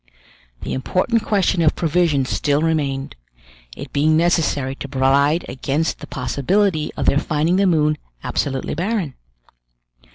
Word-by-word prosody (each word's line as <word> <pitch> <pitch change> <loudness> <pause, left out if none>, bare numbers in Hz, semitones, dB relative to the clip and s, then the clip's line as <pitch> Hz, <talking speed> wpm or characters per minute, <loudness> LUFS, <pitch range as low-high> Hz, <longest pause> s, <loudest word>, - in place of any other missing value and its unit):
The - - -3
important 185 - 0
question 190 -4 +1
of 155 - +3
provisions 160 -5 +1
still 145 +1 +1
remained; 140 -4 -1 0.6
it - - -9
being 155 +2 +3
necessary 160 -5 +1
to - - -6
provide 140 +4 +2
against 140 +5 -2
the - - -9
possibility 155 +5 0
of - - -1
their 140 - +3
finding 160 +3 0
the 195 0 +3
moon 150 -3 +2 0.2
absolutely 135 -2 -2
barren. 180 -3 -2
155 Hz, 130 wpm, -20 LUFS, 140-175 Hz, 0.6 s, of